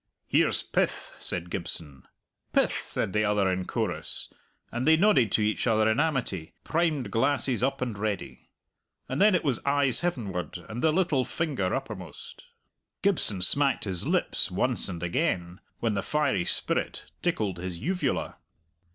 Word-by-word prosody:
"Here's - - +2
pith!" - - -1
said 90 0 -1
Gibson. 80 -7 -6 0.5
"Pith!" - - +4
said 95 - -2
the 105 0 +2
other 105 -2 +2
in 90 0 -2
chorus, 90 -9 -3 0.4
and 120 +4 -2
they 160 0 +7
nodded 170 - +4
to 110 - +3
each 105 +3 0
other 110 -1 +3
in 110 +4 +2
amity, 125 - -1
primed 155 - 0
glasses 125 +2 +1
up 135 +1 0
and 120 -4 -3
ready. 105 -1 -4 0.6
And 130 +6 -2
then 210 -1 +6
it 180 - +1
was 135 -6 0
eyes 140 -2 +3
heavenward 100 - -3
and 115 +3 -5
the 160 - +4
little 160 -6 +2
finger 135 - -1
uppermost. - - -7 0.6
Gibson 135 - +2
smacked 140 +7 +3
his 95 -4 -1
lips - - +1
once - - 0
and 90 -2 -5
again 90 - -1 0.2
when 115 -2 +1
the 100 - 0
fiery 150 -5 +1
spirit - - 0 0.2
tickled 105 - -1
his 90 -1 -4
uvula. 170 - -1
115 Hz, 150 wpm, -28 LUFS, 95-145 Hz, 0.6 s, they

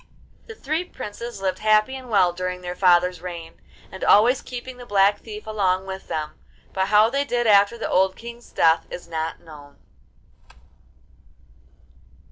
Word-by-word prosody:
The 450 - -9
three 315 -1 -2
princes 235 - -8
lived 185 -1 -1
happy 215 +4 +3
and 260 -2 -9
well 185 -5 +3
during 180 0 -4
their 180 0 -5
father's 180 -1 +3
reign, 170 -2 -8 0.3
and 190 - -8
always 240 +5 +5
keeping 250 0 -8
the 245 - -10
Black 205 0 +3
Thief 215 -1 -10
along 190 -3 0
with 190 0 -7
them; 155 -1 -3 0.4
but 190 0 0
how 215 +2 +4
they 280 +1 +1
did 245 -4 -1
after 205 +1 +4
the 230 - -3
old 190 0 +2
King's 235 +1 -11
death 165 0 +3
is 175 - -8
not 160 -1 -4
known. 150 -3 -14
200 Hz, 155 wpm, -23 LUFS, 180-235 Hz, 0.4 s, always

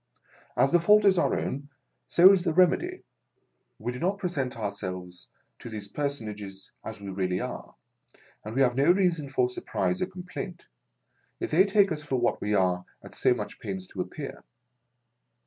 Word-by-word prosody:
As 135 - +4
the 175 - +5
fault 210 +5 +5
is 190 -3 +5
our - - +2
own, 140 +2 -4 0.4
so 180 +3 +8
is 195 -2 +4
the 165 -4 0
remedy. 190 - +3 0.7
We 120 +3 -3
do 125 - -7
not 190 +4 0
present 150 - -2
ourselves 90 -4 -5 0.3
to - - -8
these 105 -2 -6
personages 105 -7 -5
as - - -7
we 100 -1 -7
really 95 -1 -1
are, - - -6 0.7
and 110 +2 -7
we 135 - +2
have 120 -2 +2
no 140 +6 +5
reason 175 -6 +1
for 130 -2 +2
surprise 180 +8 -2
or 185 - +1
complaint, 180 -1 -7 0.7
if 355 - -3
they 190 - +6
take 200 -1 +4
us 155 -1 -2
for 145 -3 -2
what 120 -1 +1
we 105 0 0
are 90 -2 +2 0.2
at - - -11
so - - +3
much - - -6
pains 95 -1 -5
to - - -4
appear. - - -7
140 Hz, 175 wpm, -27 LUFS, -, 0.7 s, so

